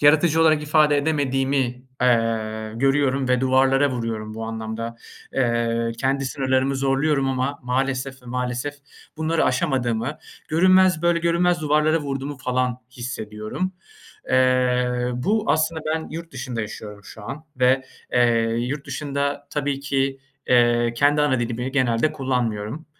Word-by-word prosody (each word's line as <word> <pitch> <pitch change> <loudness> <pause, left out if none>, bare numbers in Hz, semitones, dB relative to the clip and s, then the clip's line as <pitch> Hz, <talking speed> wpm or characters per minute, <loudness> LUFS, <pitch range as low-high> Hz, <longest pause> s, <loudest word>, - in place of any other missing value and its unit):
yaratıcı 155 +2 +4
olarak 155 -2 +4
ifade 150 -1 +3
edemediğimi, 140 -2 0 0.5
eee, 110 -3 +1
görüyorum 135 +1 +1
ve 125 0 +2
duvarlara 135 +1 +3
vuruyorum 115 -3 -4
bu 115 0 -5
anlamda. 115 +1 -5 0.4
Eee, 115 -2 0
kendi 135 +1 0
sınırlarımı 130 0 0
zorluyorum 135 +1 +1
ama 135 +2 -1
maalesef 130 +1 -2
ve 125 - -17
maalesef 125 +3 -3 0.4
bunları 160 +1 +1
aşamadığımı, 130 -3 0 0.3
görünmez, 185 +1 +4
böyle 170 0 +3
görünmez 170 0 +2
duvarlara 150 +1 +2
vurduğumu 140 0 -4
falan 125 -1 -1
hissediyorum. 120 - -5 0.6
Eee, 125 -1 +2
bu 210 - 0
aslında 160 +2 +1
ben 160 - -4
yurt 165 +1 -7
dışında 130 -2 -4
yaşıyorum 105 -1 -7
şu 110 - -11
an 140 +8 -7
ve, 130 +1 +3 0.3
eee, 120 -2 +3
yurt 140 +4 -3
dışında 140 0 -3
tabii 145 -1 -2
ki, 135 -1 -1 0.3
eee, 120 -1 +3
kendi 145 +4 +3
ana 130 -4 +2
dilimi 120 +2 -3
genelde 130 +1 +2
kullanmıyorum. 125 0 -2
135 Hz, 130 wpm, -23 LUFS, 120-145 Hz, 0.6 s, yaratıcı